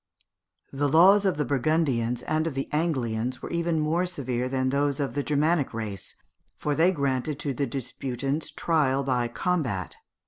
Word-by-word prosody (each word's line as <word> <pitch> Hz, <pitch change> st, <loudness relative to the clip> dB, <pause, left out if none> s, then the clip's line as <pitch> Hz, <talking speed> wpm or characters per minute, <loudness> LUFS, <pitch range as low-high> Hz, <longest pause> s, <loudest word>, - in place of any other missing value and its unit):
The 145 Hz, +1 st, +1 dB
laws 190 Hz, +7 st, +6 dB
of 185 Hz, -6 st, +1 dB
the 150 Hz, -, 0 dB
Burgundians 130 Hz, -3 st, +1 dB
and 155 Hz, +1 st, 0 dB
of 155 Hz, -, -4 dB
the 135 Hz, -, -2 dB
Anglians 130 Hz, -6 st, -1 dB
were -, -, -5 dB, 0.2 s
more 160 Hz, +3 st, +1 dB
severe 130 Hz, -7 st, -2 dB
than 130 Hz, 0 st, 0 dB
those 140 Hz, +1 st, 0 dB
of 135 Hz, -4 st, -1 dB
the 145 Hz, -, 0 dB
Germanic 150 Hz, -2 st, +1 dB
race, 105 Hz, -4 st, -5 dB, 0.4 s
for 150 Hz, -, -1 dB
they 165 Hz, +5 st, +4 dB
granted 140 Hz, -2 st, -1 dB
to 145 Hz, -2 st, -1 dB
the 140 Hz, +2 st, -1 dB
disputants 135 Hz, +3 st, -3 dB
trial 140 Hz, -5 st, +1 dB
by 125 Hz, -3 st, +1 dB
combat. 125 Hz, -, -2 dB
140 Hz, 160 wpm, -26 LUFS, 125-155 Hz, 0.4 s, laws